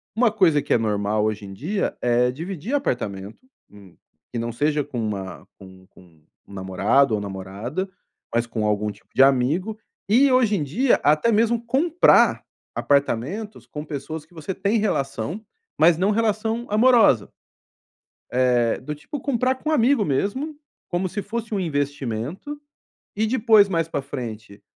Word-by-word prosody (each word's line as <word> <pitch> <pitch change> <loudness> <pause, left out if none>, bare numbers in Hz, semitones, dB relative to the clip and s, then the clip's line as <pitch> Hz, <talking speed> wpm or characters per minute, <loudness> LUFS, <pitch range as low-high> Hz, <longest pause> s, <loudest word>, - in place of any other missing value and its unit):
um 235 +1 +4
coisa 185 -9 +3
que - - -9
é - - +5
normal 105 -1 0
hoje 105 -1 -2
em 95 - -9
dia 180 - -2
é 125 0 +2
dividir 180 - -4
apartamento, 100 - -3 0.3
hum, 100 -4 -16 0.3
que 120 - -4
não 115 0 -3
seja 150 +4 0
com 125 -3 -6
uma 100 -4 -5
com 95 -1 -15
com 90 - -19 0.4
um 100 - -14
namorado 100 +7 +2
ou - - -2
namorada, 100 - -5 0.4
mas 120 +1 +1
com 110 -2 -2
algum 105 0 0
tipo - - -19
de 135 - +7
amigo. 150 - +1 0.3
E, 265 +6 +5
hoje 240 -5 +3
em 155 - -1
dia, 235 - +2
até 155 +10 +3
mesmo 230 +2 +1
comprar 310 +8 +4 0.3
apartamentos 145 - -1
com 150 0 -7
pessoas 150 +1 -6
que 160 - -26
você 160 +3 -5
tem 205 +4 0
relação, 150 - -2 0.4
mas 165 +1 +5
não 190 +4 +2
relação 225 +2 0
amorosa. 215 - +4 1.0
Eh, 125 -2 +2
do 150 +3 -5
tipo 280 - -7
comprar 260 -1 0
com 285 +4 -5
um - - +1
amigo 245 -2 +3
mesmo, 205 - -2 0.3
como 185 +1 -1
se 190 +4 -4
fosse 230 +2 -5
um 200 - 0
investimento, 145 - -3 0.6
e 220 - +1
depois 220 -3 +5
mais 165 -4 0
para 140 - -3
frente, 110 -6 -7
150 Hz, 160 wpm, -23 LUFS, -, 1.0 s, de